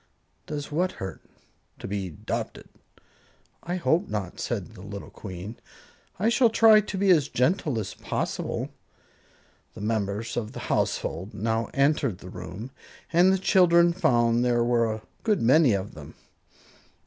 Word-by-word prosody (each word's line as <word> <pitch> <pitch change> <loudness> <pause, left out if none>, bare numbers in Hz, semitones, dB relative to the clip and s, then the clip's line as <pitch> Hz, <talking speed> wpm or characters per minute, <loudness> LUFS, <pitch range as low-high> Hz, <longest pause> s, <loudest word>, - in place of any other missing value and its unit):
"Does 145 -1 -5
what 180 +5 0
hurt?" 95 0 -7 0.6
"To - - -7
be 100 -2 -3
'dopted." 75 - -5 0.9
"I 175 +1 -3
hope 180 +1 +1
not," 95 -4 -4
said - - -3
the - - -12
little 100 0 -8
Queen; 95 +3 -8 0.6
"I 205 - +1
shall 235 +1 +4
try 220 -1 +6
to 205 -1 -5
be 195 0 +4
as 150 -5 +4
gentle 150 -1 +1
as 100 -3 -5
possible." - - -3 1.1
The - - -8
members 105 0 -2
of 110 -3 -3
the - - -7
household 95 +6 -2
now 115 +1 -1
entered 140 - +2
the 90 - -11
room 105 +10 -8 0.4
and 180 +3 +6
the 190 - +3
children 175 -2 +4
found 120 -8 +2
there 120 -1 +2
were 120 -2 +2
a 110 0 -5 0.2
good 215 -4 +1
many 135 +1 +5
of 100 0 -3
them. - - -11
120 Hz, 150 wpm, -26 LUFS, 105-175 Hz, 1.1 s, try